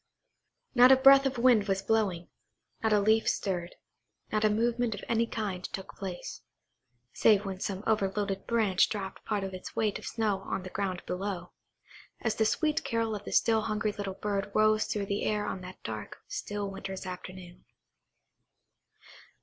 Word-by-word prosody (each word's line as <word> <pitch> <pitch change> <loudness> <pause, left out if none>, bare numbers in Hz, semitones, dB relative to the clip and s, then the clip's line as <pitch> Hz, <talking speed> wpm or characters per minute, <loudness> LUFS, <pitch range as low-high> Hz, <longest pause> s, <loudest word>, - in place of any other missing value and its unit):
Not 250 0 +8
a - - +10
breath 270 +1 +7
of 265 -1 -3
wind 235 -4 +4
was 195 0 0
blowing, 195 -5 0 0.5
not 220 - +1
a 210 - +5
leaf 220 +2 +3
stirred; 180 -3 -2 0.6
not 215 0 +1
a 215 - +5
movement 235 +1 +1
of 200 - -10
any 230 0 +1
kind 195 -6 -3
took 195 0 -6
place, 185 -3 -6 0.7
save 210 -2 +4
when 190 -1 -4
some 195 +1 -3
overloaded 200 -2 0
branch 215 -6 +3
dropped 195 -3 -5
part 210 -2 -1
of 190 -1 -5
its 185 - -8
weight 215 -2 0
of - - -9
snow 215 -4 0
on 195 -1 -4
the 185 - -8
ground 190 -2 -3
below; 180 -1 -4 0.7
as 220 - 0
the 220 - +1
sweet 305 +7 +1
carol 230 -1 -1
of 205 -1 -6
the - - -6
still 225 -1 +3
hungry 215 0 -1
little 200 -2 -5
bird 200 0 -2
rose 215 0 +4
through 205 -2 -2
the 200 +1 -2
air 210 -1 0
on 185 - -4
that 180 +1 -11
dark, 110 -1 -6
still 205 -1 -4
winter's 195 0 -6
afternoon. 180 -1 -9
205 Hz, 170 wpm, -30 LUFS, 190-220 Hz, 0.7 s, a